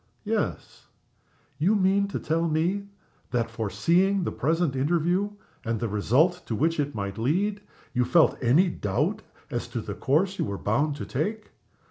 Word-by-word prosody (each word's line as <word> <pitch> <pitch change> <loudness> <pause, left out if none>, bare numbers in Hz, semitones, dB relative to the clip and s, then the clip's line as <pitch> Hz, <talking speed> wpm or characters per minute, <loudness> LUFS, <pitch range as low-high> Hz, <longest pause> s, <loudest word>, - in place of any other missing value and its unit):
_" - - -42 0.2
"Yes." - - -3 0.7
"You 185 +8 +3
mean 200 0 +3
to 200 - -4
tell 165 +2 0
me 175 +6 0 0.4
that, 115 -2 -1
foreseeing 170 - +1
the - - -2
present 160 0 0
interview 170 +8 +1 0.3
and 115 -1 -1
the 115 - -1
result 130 - +2
to 115 - -1
which 160 +7 +1
it 145 0 -1
might 100 0 -4
lead, 195 - 0 0.3
you 125 -2 +2
felt 155 +7 +4
any 140 +10 +4
doubt 100 - -1 0.3
as - - -3
to - - -4
the - - -5
course 185 +8 +1
you - - +1
were 100 -1 -4
bound 140 +10 0
to - - -6
take? 210 - -3
155 Hz, 165 wpm, -26 LUFS, 120-185 Hz, 0.7 s, felt